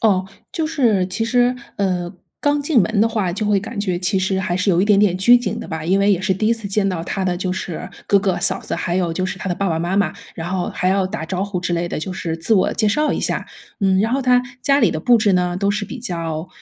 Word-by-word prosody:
哦， 190 Hz, -4 st, +2 dB, 0.3 s
就 320 Hz, -2 st, -1 dB
是 225 Hz, -, +2 dB
其 210 Hz, +5 st, -2 dB
实， 245 Hz, +1 st, +2 dB, 0.2 s
呃， 180 Hz, -2 st, -1 dB, 0.3 s
刚 290 Hz, 0 st, +2 dB
进 285 Hz, -3 st, +2 dB
门 210 Hz, +2 st, +1 dB
的 225 Hz, -, +4 dB
话 210 Hz, -6 st, -1 dB
就 210 Hz, +3 st, -2 dB
会 205 Hz, -1 st, +3 dB
感 205 Hz, +1 st, -5 dB
觉 185 Hz, -4 st, -1 dB
其 190 Hz, +2 st, +1 dB
实 190 Hz, 0 st, 0 dB
还 180 Hz, -2 st, -1 dB
是 185 Hz, +2 st, -1 dB
有 175 Hz, -1 st, +4 dB
一 -, -, +3 dB
点 205 Hz, -1 st, +4 dB
点 195 Hz, -3 st, +3 dB
拘 235 Hz, +6 st, +6 dB
谨 245 Hz, -, -3 dB
的 -, -, -7 dB
吧， 160 Hz, -2 st, -5 dB
因 190 Hz, +4 st, +2 dB
为 200 Hz, +1 st, +4 dB
也 180 Hz, -, 0 dB
是 190 Hz, 0 st, +1 dB
第 215 Hz, +3 st, -1 dB
一 230 Hz, -, +4 dB
次 225 Hz, -3 st, -4 dB
见 195 Hz, 0 st, +1 dB
到 180 Hz, -3 st, -2 dB
他 190 Hz, +2 st, -3 dB
的 180 Hz, -1 st, 0 dB
就 185 Hz, 0 st, -2 dB
是 180 Hz, -1 st, -5 dB, 0.2 s
哥 200 Hz, -, +4 dB
哥 190 Hz, -3 st, 0 dB
嫂 190 Hz, +1 st, 0 dB
子， -, -, -4 dB
还 175 Hz, 0 st, -2 dB
有 175 Hz, -3 st, 0 dB
就 185 Hz, +2 st, -2 dB
是 185 Hz, -, -4 dB
他 190 Hz, -, -4 dB
的 175 Hz, -, 0 dB
爸 195 Hz, 0 st, -1 dB
爸 160 Hz, -1 st, 0 dB
妈 175 Hz, +3 st, -1 dB
妈， 200 Hz, -, +2 dB, 0.2 s
然 170 Hz, +1 st, -5 dB
后 185 Hz, -2 st, -1 dB
还 180 Hz, -, 0 dB
要 190 Hz, 0 st, +2 dB
打 190 Hz, -4 st, -5 dB
招 185 Hz, +3 st, -2 dB
呼 200 Hz, -2 st, -3 dB
之 175 Hz, 0 st, -2 dB
类 170 Hz, 0 st, -1 dB
的， -, -, -3 dB
就 180 Hz, +4 st, -4 dB
是 165 Hz, -3 st, -3 dB
自 165 Hz, +7 st, -1 dB
我 190 Hz, -, +3 dB
介 215 Hz, -, 0 dB
绍 300 Hz, +8 st, +1 dB
一 -, -, -2 dB
下， -, -, -2 dB, 0.3 s
嗯。 190 Hz, -1 st, +3 dB
然 225 Hz, +3 st, 0 dB
后 275 Hz, -, +1 dB
他 250 Hz, -1 st, +3 dB, 0.2 s
家 280 Hz, 0 st, +3 dB
里 -, -, +4 dB
的 -, -, -3 dB
布 245 Hz, -1 st, +5 dB
置 215 Hz, -3 st, +2 dB
呢， 180 Hz, -1 st, +1 dB
都 200 Hz, +1 st, +1 dB
是 205 Hz, 0 st, -1 dB
比 260 Hz, -, -8 dB
较 165 Hz, -6 st, -4 dB
190 Hz, 310 characters per minute, -20 LUFS, 180-215 Hz, 0.3 s, 拘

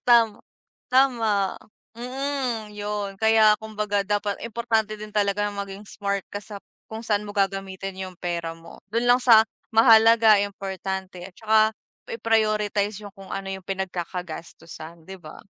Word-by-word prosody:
Tama, 230 Hz, -3 st, +4 dB, 0.5 s
tama. 225 Hz, -7 st, +2 dB, 0.4 s
Mm, 250 Hz, -2 st, -3 dB
'yon 205 Hz, -1 st, -4 dB
kaya 220 Hz, 0 st, +5 dB
kumbaga 210 Hz, -2 st, -2 dB
dapat 205 Hz, 0 st, -1 dB
importante 225 Hz, -2 st, -1 dB
din 215 Hz, -, -7 dB
talaga 205 Hz, 0 st, 0 dB
maging 200 Hz, -1 st, -6 dB
smart 200 Hz, -1 st, -2 dB
ka 205 Hz, 0 st, -7 dB
sa 205 Hz, -2 st, -9 dB, 0.3 s
kung 220 Hz, 0 st, -7 dB
saan 210 Hz, -2 st, -1 dB
mo 205 Hz, -, -7 dB
gagamitin 195 Hz, -1 st, -2 dB
yung 185 Hz, -1 st, -7 dB
pera 170 Hz, -2 st, -3 dB
mo. 165 Hz, 0 st, -14 dB
Do'n 235 Hz, +2 st, +1 dB
lang 245 Hz, -, +7 dB
sa 225 Hz, -3 st, +6 dB, 0.2 s
mahalaga, 225 Hz, -1 st, +7 dB
importante 190 Hz, -2 st, -5 dB
at 190 Hz, -, -10 dB
saka 220 Hz, +1 st, +2 dB, 0.5 s
i-prioritize 215 Hz, -, 0 dB
yung 205 Hz, -1 st, -9 dB
kung 195 Hz, -1 st, -11 dB
ano 195 Hz, 0 st, -4 dB
yung 190 Hz, -1 st, -6 dB
pinagkakagastusan, 170 Hz, -3 st, -6 dB
'di 190 Hz, -, -7 dB
ba? 155 Hz, -4 st, -12 dB
205 Hz, 140 wpm, -24 LUFS, 195-220 Hz, 0.5 s, lang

